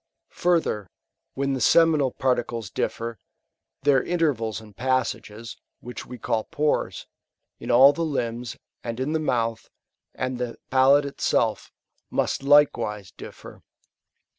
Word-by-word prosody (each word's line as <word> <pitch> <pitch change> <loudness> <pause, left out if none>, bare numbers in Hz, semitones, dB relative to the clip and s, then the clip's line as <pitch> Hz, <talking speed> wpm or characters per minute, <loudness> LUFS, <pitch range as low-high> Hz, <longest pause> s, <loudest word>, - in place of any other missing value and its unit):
Further, 165 - 0 0.5
when 140 0 -1
the 130 - -3
seminal 155 0 +4
particles 120 -6 -1
differ, 115 0 -3 0.6
their 140 -1 +4
intervals 135 - -1
and 105 -2 -15
passages, 115 -2 -2 0.2
which 125 +1 -8
we 125 - -8
call 110 -1 -1
pores, 150 0 -1 0.5
in 120 - -8
all 130 +4 +7
the 170 - -4
limbs, 120 -6 -3 0.3
and 115 0 -5
in 140 +4 -1
the 160 - +1
mouth, 115 -6 -1 0.5
and 130 -1 -3
the 125 -1 -4
palate 135 +2 +5
itself, 140 - -1 0.4
must - - -1
likewise 135 -9 +3
differ. - - -12
125 Hz, 120 wpm, -25 LUFS, 115-140 Hz, 0.6 s, all